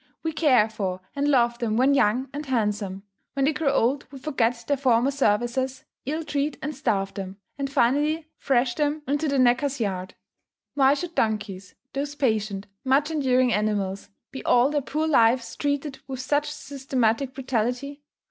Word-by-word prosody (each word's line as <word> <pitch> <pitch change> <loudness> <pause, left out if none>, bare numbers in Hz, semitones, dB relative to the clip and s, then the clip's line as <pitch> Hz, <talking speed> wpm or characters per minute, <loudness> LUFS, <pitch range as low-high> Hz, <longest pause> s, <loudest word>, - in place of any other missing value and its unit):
We 320 - -1
care 260 -9 +4
for 195 -4 -3 0.2
and 285 +1 0
love 240 -4 +3
them 220 -2 0
when 265 +3 +4
young 255 0 +2
and 290 +1 -4
handsome; 210 -5 -1 0.3
when 275 -1 +1
they 305 - +2
grow 300 -2 +1
old 270 +1 +1
we 275 - -9
forget 245 -4 -1
their 285 - +2
former 255 -1 +2
services, 260 +1 0 0.2
ill 310 +3 -2
treat 295 -1 -2
and 300 +1 -4
starve 200 -7 -1
them, 195 -1 -6 0.2
and 275 -1 -2
finally 295 +6 +2
thrash 245 -2 +2
them 300 +1 -1
into 290 +3 0
the 280 -1 +1
knacker's 260 +2 +2
yard. 185 -4 -3 0.6
Why 275 0 +4
should 340 +3 -5
donkeys 205 - -2 0.2
those 285 +1 -3
patient, 215 -7 0 0.2
much 280 +4 +2
enduring 255 -5 +2
animals 205 -2 -1 0.2
be 265 - -7
all 245 +3 +4
their 295 -1 +1
poor 305 +4 -2
lives 235 -4 +3
treated 285 -1 -2
with 265 -2 -5
such 290 +3 0
systematic 265 -3 -1
brutality? 265 +2 -2
260 Hz, 165 wpm, -25 LUFS, 225-285 Hz, 0.6 s, care